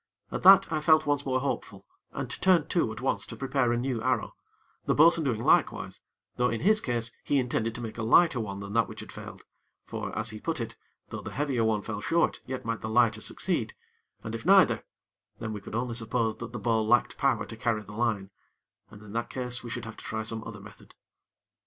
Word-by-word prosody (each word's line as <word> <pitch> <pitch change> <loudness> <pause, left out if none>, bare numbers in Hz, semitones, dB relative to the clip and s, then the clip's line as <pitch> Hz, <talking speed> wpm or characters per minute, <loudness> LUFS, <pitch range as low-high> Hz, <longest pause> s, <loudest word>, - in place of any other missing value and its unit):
At - - -3
that, 195 -1 +8
I 155 - 0
felt 155 0 +5
once 145 -1 0
more 130 -1 +1
hopeful, 140 - -4 0.3
and - - -4
turned 180 -5 +3
to 165 -10 +1
at 110 +2 -8
once 130 - 0
to - - -8
prepare 135 -2 0
a 120 - +1
new 125 -2 -2
arrow; 125 -2 0 0.5
the - - +2
bo'sun 165 +1 +6
doing 115 -4 -1
likewise; - - +2 0.4
though 125 0 +2
in 115 - -2
his 215 +4 +4
case 115 -2 -2
he 145 - +1
intended 115 -3 -1
to 120 - -5
make 115 0 -6
a - - -1
lighter 130 +5 +4
one 100 -3 -4
than 100 0 -7
that 115 -1 +3
which - - -8
had - - -10
failed; - - -9 0.4
for, - - -5
as 115 0 +1
he 110 - -8
put 160 +5 -3
it, 115 - -5 0.3
though - - -6
the - - -6
heavier 135 -5 -1
one 110 -2 +1
fell 105 0 -5
short, 170 +7 +1
yet 130 -2 -5
might 115 -1 -2
the 110 - -4
lighter 110 -1 +3
succeed, - - -1 0.5
and 110 - -5
if 115 - -5
neither, 195 0 +5 0.5
then 115 -1 -5
we 105 - -6
could 100 - -8
only 120 +1 -1
suppose 115 -1 -1
that 115 +1 -7
the 120 - -5
bow 110 +1 +1
lacked 110 +3 +2
power 135 -7 +1
to 115 - -9
carry 115 -2 -1
the 105 - -12
line, 105 -4 -1 0.6
and 105 0 -13
in 105 -1 -11
that 115 +1 -2
case, 125 -1 -3
we 120 - -7
should 120 0 -5
have 115 - -9
to - - -11
try 110 0 -3
some 110 0 -5
other 110 -2 -8
method. 100 +1 -15
115 Hz, 225 wpm, -28 LUFS, 110-135 Hz, 0.6 s, that